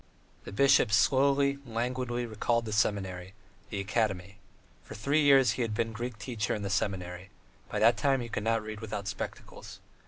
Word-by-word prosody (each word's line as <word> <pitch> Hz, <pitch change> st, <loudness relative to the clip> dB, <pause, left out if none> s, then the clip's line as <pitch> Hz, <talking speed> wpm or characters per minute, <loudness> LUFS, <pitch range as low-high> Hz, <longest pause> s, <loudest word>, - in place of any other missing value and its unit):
The -, -, -7 dB
bishop 135 Hz, 0 st, +4 dB
slowly, 140 Hz, +5 st, +3 dB
languidly, 120 Hz, 0 st, -2 dB
recalled 115 Hz, +1 st, -1 dB
the 110 Hz, -, -4 dB
seminary, 95 Hz, -2 st, -1 dB, 0.3 s
the 100 Hz, -, -4 dB
academy. 100 Hz, -2 st, -2 dB, 0.4 s
For -, -, -10 dB
three 140 Hz, +8 st, +1 dB
years 135 Hz, -5 st, +6 dB
he 105 Hz, -, -3 dB
had 115 Hz, -3 st, -1 dB
been 115 Hz, +1 st, -1 dB
Greek 120 Hz, +1 st, -5 dB
teacher 110 Hz, +2 st, -2 dB
in 105 Hz, -, -5 dB
the 100 Hz, -, -3 dB
seminary: 95 Hz, -2 st, -2 dB, 0.4 s
by -, -, -3 dB
that 115 Hz, +2 st, +5 dB
time 135 Hz, -2 st, +2 dB
he 120 Hz, -, -5 dB
could 110 Hz, -, -3 dB
not 115 Hz, -1 st, +1 dB
read 110 Hz, -1 st, -7 dB
without 105 Hz, -2 st, -5 dB
spectacles. -, -, -7 dB
110 Hz, 175 wpm, -29 LUFS, 100-125 Hz, 0.4 s, years